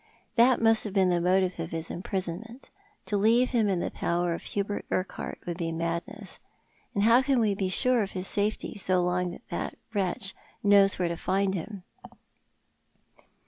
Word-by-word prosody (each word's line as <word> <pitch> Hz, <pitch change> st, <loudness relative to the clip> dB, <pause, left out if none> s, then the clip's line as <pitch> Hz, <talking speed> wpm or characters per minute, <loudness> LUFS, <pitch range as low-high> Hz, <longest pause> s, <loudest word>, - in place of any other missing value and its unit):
" -, -, -38 dB
That 245 Hz, +1 st, +5 dB
must 225 Hz, -1 st, +5 dB
have 205 Hz, -, -5 dB
been 190 Hz, -2 st, +4 dB
the 175 Hz, -1 st, +1 dB
motive 185 Hz, 0 st, +1 dB
of 165 Hz, -1 st, -3 dB
his 165 Hz, -1 st, -5 dB
imprisonment. 195 Hz, +6 st, -5 dB, 0.3 s
To 205 Hz, -, 0 dB
leave 230 Hz, +5 st, +3 dB
him 225 Hz, -5 st, +2 dB
in 185 Hz, -3 st, 0 dB
the -, -, -3 dB
power 175 Hz, 0 st, -1 dB
of 165 Hz, -, -5 dB
Hubert 205 Hz, 0 st, -3 dB
Urquhart 185 Hz, +1 st, -3 dB
would 175 Hz, -1 st, -4 dB
be 165 Hz, -2 st, -2 dB
madness; 170 Hz, +5 st, -4 dB, 0.6 s
and 200 Hz, -, +2 dB
how 230 Hz, +3 st, +6 dB
can 265 Hz, -1 st, +2 dB
we 215 Hz, -3 st, +2 dB
be 195 Hz, -1 st, -2 dB
sure 250 Hz, +4 st, +3 dB
of 200 Hz, -, -4 dB
his 185 Hz, 0 st, -3 dB
safety 205 Hz, +1 st, -1 dB
so 185 Hz, -2 st, +2 dB
long 180 Hz, 0 st, -1 dB
as -, -, -14 dB
that -, -, -4 dB, 0.2 s
wretch 195 Hz, -1 st, -1 dB, 0.3 s
knows 200 Hz, -1 st, +5 dB
where 180 Hz, -, 0 dB
to 170 Hz, -, -2 dB
find 195 Hz, +2 st, 0 dB
him 195 Hz, +1 st, -6 dB
195 Hz, 185 wpm, -28 LUFS, 180-215 Hz, 0.6 s, how